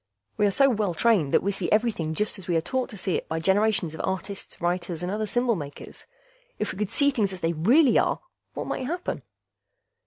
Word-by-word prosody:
We 210 - +3
are - - +1
so 275 +7 +5
well 210 -8 0
trained 200 -12 +3
that - - +3
we 200 - +1
see 190 -3 -3
everything 210 -8 +1
just 210 +1 0
as 185 - -11
we 175 - +1
are - - +1
taught 255 +9 -2
to 210 - -8
see 185 -1 0
it - - -7
by 160 - -1
generations 195 -1 +2
of 160 - -5
artists, 190 +1 -4
writers, 175 -1 -2
and 180 - -2
other 215 +1 -2
symbol 245 +1 +1
makers. 145 -5 -9 0.5
If - - -2
we 190 - -10
could 210 -2 -1
see 285 0 +3
things 210 -7 0
as 185 - -9
they 165 +1 +1
really 240 - +5
are, - - +1 0.4
what - - -3
might 255 - -3
happen?" 350 +4 -3
195 Hz, 225 wpm, -26 LUFS, 175-225 Hz, 0.5 s, so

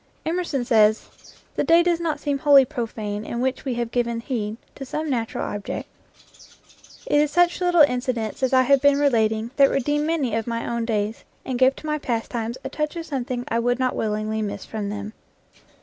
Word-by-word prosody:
Emerson 320 -6 -1
says, 220 -3 +3 0.5
"The - - +1
day 335 +1 +5
does 345 -1 +1
not 330 -2 -2
seem 285 -2 -1
wholly 280 -1 +6
profane 220 -6 -4
in 235 +2 -4
which 260 +2 -1
we 260 -3 -1
have 235 -1 -3
given 235 -1 0
heed 225 -3 -3 0.2
to 275 - -8
some 305 +3 -3
natural 230 -3 -2
object." 205 -1 -5 1.2
It 295 - +3
is 300 - +1
such 350 +3 +2
little 350 -3 +5
incidents 250 -5 -1
as 260 - +1
I 260 -1 +5
have 275 +1 +4
been 285 -1 +5
relating 225 -5 +1
that 275 -1 +6
redeem 295 +3 0
many 300 -8 0
of 225 0 -1
my 230 0 -3
own 235 -1 -2
days, 215 -1 -2 0.2
and 255 -2 -3
give 260 +1 +4
to - - -12
my 305 0 -1
pastimes 235 -2 -3
a - - -3
touch 300 +2 -3
of 335 -1 -5
something 255 -4 -3
I 230 - 0
would 245 +1 +1
not 255 -1 0
willingly 215 0 -2
miss 205 -1 -4
from 210 -2 -4
them. 205 +1 -6
250 Hz, 195 wpm, -23 LUFS, 225-290 Hz, 1.2 s, wholly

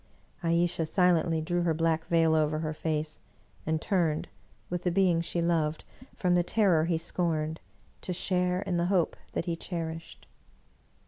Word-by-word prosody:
Ayesha 170 -1 +1
silently 170 -2 +2
drew 175 +2 0
her 170 -2 +1
black 165 0 0
veil 165 -1 +3
over 155 -1 +2
her 155 0 -2
face, 155 0 -3 0.5
and 160 0 +1
turned, 165 -5 0 0.4
with 175 0 -3
the 180 - +1
being 180 -2 +3
she 170 0 -2
loved, 160 -2 0 0.3
from 180 -2 +1
the 175 - +4
terror 175 -4 +3
he 170 -1 +1
scorned, 160 -2 -1 0.4
to - - -4
share 180 +1 0
in 180 - -1
the 170 - +1
hope 180 -3 +1 0.2
that - - -2
he 170 -2 -1
cherished. 165 -1 -6
170 Hz, 155 wpm, -29 LUFS, 160-180 Hz, 0.5 s, the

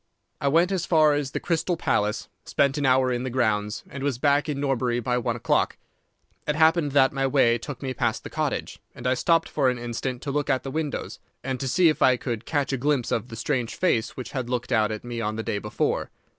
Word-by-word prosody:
"I 140 - +1
went 165 +6 +3
as 185 -3 -1
far 155 -3 +5
as 145 -2 -1
the - - -3
Crystal 170 +1 -1
Palace, 105 -6 0 0.2
spent 140 -1 +1
an 140 - +1
hour 130 0 +4
in 120 -1 -1
the 130 - -3
grounds, 110 -4 0
and 140 - -8
was 140 -3 -1
back 145 +3 +2
in 140 -2 -2
Norbury 125 -3 0
by 125 +1 0
one 120 -1 -1
o'clock. 120 - +1 0.7
It 150 - +1
happened 160 -2 +3
that 135 -2 +4
my 135 0 +1
way 120 -4 +3
took 145 +4 -7
me 130 -1 -2
past - - -1
the - - -8
cottage, - - -2 0.2
and 120 - -10
I 125 - +3
stopped 165 +6 +2
for 135 -4 +1
an 125 - -1
instant 120 +1 -4
to 140 - -3
look 145 0 -1
at 130 -2 +1
the 135 - -5
windows, 155 -1 -3 0.2
and 130 -1 -3
to 135 - -2
see 170 +7 +4
if 155 -3 +1
I 130 -1 +5
could 120 -3 -4
catch 145 -3 0
a - - +1
glimpse 140 -1 0
of 115 - -1
the 115 - -8
strange 120 0 -2
face 115 -11 0
which 130 - -6
had 130 -3 -3
looked 125 0 -2
out 110 -2 +3
at 110 - -5
me 120 -1 -4
on 105 0 -2
the 110 - -3
day 100 - -2
before. 105 +1 -1
130 Hz, 240 wpm, -25 LUFS, 120-145 Hz, 0.7 s, far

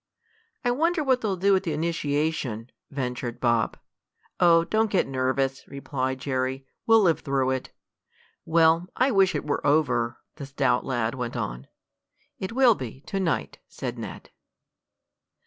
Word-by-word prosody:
"I 245 - +3
wonder 325 +5 +1
what 260 -2 +2
they'll 205 -3 0
do 195 +2 +4
at 190 - +2
the 170 -5 -3
initiation?" 150 -7 -2 0.2
ventured 125 -3 -4
Bob. 120 -2 +1 0.6
"Oh, 165 -1 +6
don't 220 +5 +1
get 195 - +2
nervous," 135 0 -1
replied 130 -1 -3
Jerry. 130 0 -2 0.2
"We'll 225 -1 +6
live 170 -5 +3
through 135 -2 0
it." 130 -1 -3 0.7
"Well, 165 +1 +3
I 260 +2 +2
wish 195 -3 +3
it - - -2
were 145 -1 -1
over," 130 -5 +2 0.2
the 140 -3 -7
stout 135 -2 +1
lad 120 -4 -1
went 125 -2 -4
on. - - -4 0.7
"It 190 +2 -4
will 250 -1 +5
be, 130 - -8
to 195 +5 -4
night," 170 -5 -1
said - - -6
Ned. - - -8
145 Hz, 145 wpm, -26 LUFS, 130-190 Hz, 0.7 s, Oh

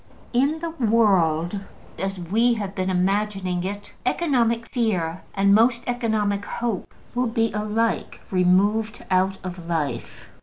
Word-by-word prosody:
In 285 +6 +2
the 335 -1 -3
world 200 - +2 0.4
as 195 0 -2
we 220 +8 +2
have 200 -3 -4
been 185 -1 -1
imagining 190 -1 0
fit, 200 +3 -5
economic 235 -8 +1
fear 185 -10 -1
and 200 0 +4
most 235 +2 +4
economic 220 -4 0
hope 230 -3 -3 0.2
will 250 0 +1
be 225 0 0
alike 215 +2 -1
removed 200 +5 +2
out 190 +1 +2
of 180 -2 -7
life. 145 -8 -3
205 Hz, 125 wpm, -24 LUFS, 185-230 Hz, 0.4 s, and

